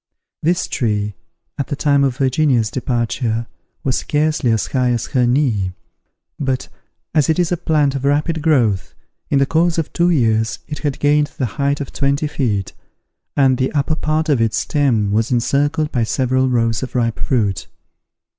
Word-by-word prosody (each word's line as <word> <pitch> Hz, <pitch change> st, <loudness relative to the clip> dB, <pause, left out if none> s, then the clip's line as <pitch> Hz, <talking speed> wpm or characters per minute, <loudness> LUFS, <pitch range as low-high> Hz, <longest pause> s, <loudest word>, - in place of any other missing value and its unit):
This 175 Hz, +4 st, +1 dB
tree, 105 Hz, -5 st, -1 dB, 0.5 s
at 140 Hz, -, -1 dB
the 145 Hz, -, -2 dB
time 140 Hz, -1 st, +2 dB
of 130 Hz, -2 st, 0 dB
Virginia's 130 Hz, -4 st, +2 dB
departure, 120 Hz, -2 st, -1 dB, 0.4 s
was 130 Hz, -4 st, 0 dB
scarcely 150 Hz, -3 st, 0 dB
as 110 Hz, -2 st, +1 dB
high 125 Hz, -2 st, 0 dB
as 120 Hz, -2 st, 0 dB
her 125 Hz, -3 st, +3 dB
knee; 120 Hz, -8 st, +1 dB, 0.7 s
but, 130 Hz, -2 st, -2 dB, 0.4 s
as 155 Hz, -1 st, +2 dB
it 160 Hz, -, +2 dB
is 175 Hz, -2 st, +1 dB
a -, -, +3 dB
plant 150 Hz, -4 st, +1 dB
of 135 Hz, -1 st, -4 dB
rapid 150 Hz, +3 st, +1 dB
growth, 120 Hz, -, +1 dB, 0.3 s
in 140 Hz, -, +2 dB
the 135 Hz, -, +4 dB
course 165 Hz, +3 st, +1 dB
of 165 Hz, -, -2 dB
two 175 Hz, 0 st, +2 dB
years 110 Hz, -8 st, +1 dB
it 150 Hz, -, -5 dB
had 145 Hz, -3 st, -2 dB
gained 145 Hz, 0 st, +3 dB
the 130 Hz, -, 0 dB, 0.2 s
height 140 Hz, +1 st, +1 dB
of 140 Hz, -, -6 dB
twenty 140 Hz, +2 st, 0 dB
feet, 115 Hz, -10 st, -2 dB, 0.6 s
and 130 Hz, -2 st, +3 dB
the 130 Hz, -, 0 dB
upper 145 Hz, +1 st, +1 dB
part 155 Hz, +1 st, -1 dB
of 140 Hz, -6 st, +2 dB
its 115 Hz, -1 st, +1 dB
stem 120 Hz, -9 st, +1 dB
was 110 Hz, +4 st, +1 dB
encircled 145 Hz, +5 st, +1 dB
by 120 Hz, -4 st, +1 dB
several 130 Hz, +3 st, +1 dB
rows 115 Hz, -2 st, +1 dB
of 130 Hz, -, -6 dB
ripe 115 Hz, -2 st, 0 dB
fruit. 105 Hz, -8 st, 0 dB
135 Hz, 175 wpm, -18 LUFS, 115-150 Hz, 0.7 s, the